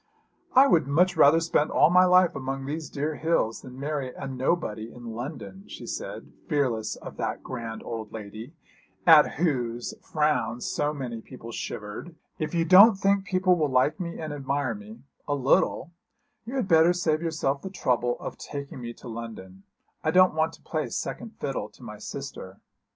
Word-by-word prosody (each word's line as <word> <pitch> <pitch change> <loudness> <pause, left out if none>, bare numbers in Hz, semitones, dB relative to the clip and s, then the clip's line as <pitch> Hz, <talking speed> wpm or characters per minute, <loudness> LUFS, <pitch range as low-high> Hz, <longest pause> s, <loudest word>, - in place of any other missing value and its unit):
'I 265 +2 +9
would 170 - +3
much 180 +6 +3
rather 155 0 +6
spend 160 -2 +1
all 155 - +4
my 180 +1 +6
life 180 -1 +5
among 135 0 -4
these 155 +3 -4
dear 150 +1 -3
hills 160 -9 0
than 130 0 -11
marry 140 -2 -3
a 135 - -8
nobody 130 -4 -2
in 120 -1 -9
London,' 150 - -7
she - - -9
said, - - -6 0.2
fearless 130 -8 0
of - - -10
that - - -3
grand 115 -3 -6
old 110 -2 -6
lady 110 +7 -8 0.5
at 160 -3 +7
whose 120 -8 -1
frown 150 -7 0
so 145 +4 -1
many 125 -6 -5
people 115 -1 -10
shivered. 105 +10 -6 0.2
'If 155 +1 -3
you 165 -1 +2
don't 195 +6 +8
think 195 0 +2
people 185 -1 +3
will 155 -4 0
like 130 +7 +2
me 170 -2 -5
and 155 -2 -4
admire 140 -3 -1
me 110 +3 -11 0.2
a 145 - +1
little 140 +3 +2 0.6
you 250 - -5
had 255 -7 0
better 165 0 +5
save 160 -3 0
yourself 155 -4 -1
the 190 - -6
trouble 125 -9 0
of - - -7
taking 140 -3 -7
me 120 -1 -6
to 125 - -13
London. 110 -5 -8 0.4
I - - +1
don't 185 0 +5
want 160 +1 0
to - - -16
play 155 -2 -2
second 230 - -5
fiddle 130 -6 -3
to 110 - -18
my 105 -3 -9
sister.' 105 -7 -7
145 Hz, 180 wpm, -26 LUFS, 120-165 Hz, 0.6 s, I